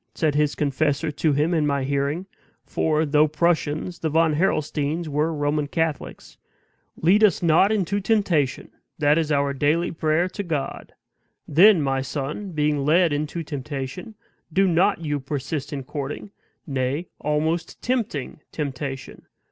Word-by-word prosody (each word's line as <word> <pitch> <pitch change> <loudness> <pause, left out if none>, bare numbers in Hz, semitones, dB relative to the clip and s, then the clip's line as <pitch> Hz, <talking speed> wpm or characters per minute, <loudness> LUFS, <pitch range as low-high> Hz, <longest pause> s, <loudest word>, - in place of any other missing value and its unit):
said 155 -2 +1
his 150 0 +1
confessor 145 +1 0
to 155 +1 0
him 150 +5 +1
in 155 -3 +2
my 140 -1 0
hearing 140 +6 -1 0.4
(for, 155 +2 0
though 150 +1 +4
Prussians, 160 +1 0
the 160 - -1
Von 160 +1 +3
Harrelsteins 155 -1 0
were 150 +2 0
Roman 145 -1 -1
Catholics), 160 -1 -3 0.6
"lead 195 +7 +4
us 205 -4 +4
not 170 +5 +4
into 200 -1 0
temptation! 190 - 0 0.3
that 150 +1 +3
is 155 -2 -1
our 140 -1 +1
daily 150 +5 +1
prayer 160 +2 +1
to 205 - -5
God. 160 -7 -4 0.5
Then, 175 +2 +6
my 135 -1 0
son, 145 +8 -4
being 150 -2 +1
led 165 +2 +3
into 150 +3 -3
temptation, 145 - -6 0.4
do 195 +4 +3
not 175 0 +2
you 145 -1 -1
persist 140 +1 -4
in 140 -2 -4
courting, 145 +9 -6 0.3
nay, 135 +3 -2
almost 160 +3 -1
tempting 220 - -2
temptation. 135 -2 -5
155 Hz, 140 wpm, -23 LUFS, 145-170 Hz, 0.6 s, Then